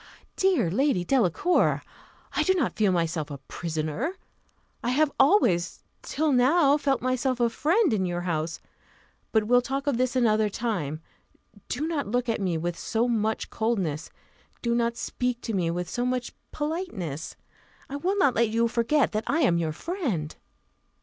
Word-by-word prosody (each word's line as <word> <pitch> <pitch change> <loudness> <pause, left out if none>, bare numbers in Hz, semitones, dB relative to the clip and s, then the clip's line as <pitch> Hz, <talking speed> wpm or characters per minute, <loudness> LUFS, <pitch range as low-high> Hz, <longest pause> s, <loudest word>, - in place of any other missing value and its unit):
"Dear 355 - +2
Lady 260 -3 +2
Delacour! 265 - +2 0.5
I - - +3
do 375 - +3
not 305 -10 0
feel 210 -3 +3
myself 165 -3 -1
a 140 - -6
prisoner; 160 - -3 0.7
I 240 - 0
have 290 +3 +2
always 240 - +3 0.2
till 310 0 0
now 280 +3 +4
felt 275 -4 0
myself 255 0 0
a 235 -1 +2
friend 345 - +2
in 190 -3 +1
your 175 0 -2
house; 165 -2 -2 0.7
but 220 -1 +3
we'll 245 +3 +4
talk 275 +3 -3
of 280 -5 0
this 255 0 +1
another 220 -4 +3
time. 180 - -3 0.7
Do 295 +6 -2
not 315 -4 -2
look 245 +3 0
at 225 - 0
me 180 -4 0
with 170 +1 -3
so 230 +2 0
much 220 -2 -1
coldness; 195 -10 -1 0.5
do 235 -1 +1
not 235 0 0
speak 250 -1 -2
to 225 - -4
me 180 -4 +1
with 175 +1 -2
so 245 +7 -2
much 250 -1 -2 0.2
politeness. 295 - -4 0.5
I 280 - -5
will 375 +7 -1
not 325 -10 +4
let 235 -1 +2
you 230 +1 +2
forget 240 +5 +2
that 215 +1 -2
I 325 +3 +1
am 175 - +3
your 160 -2 -1
friend." 215 - -3
235 Hz, 165 wpm, -26 LUFS, 180-275 Hz, 0.7 s, now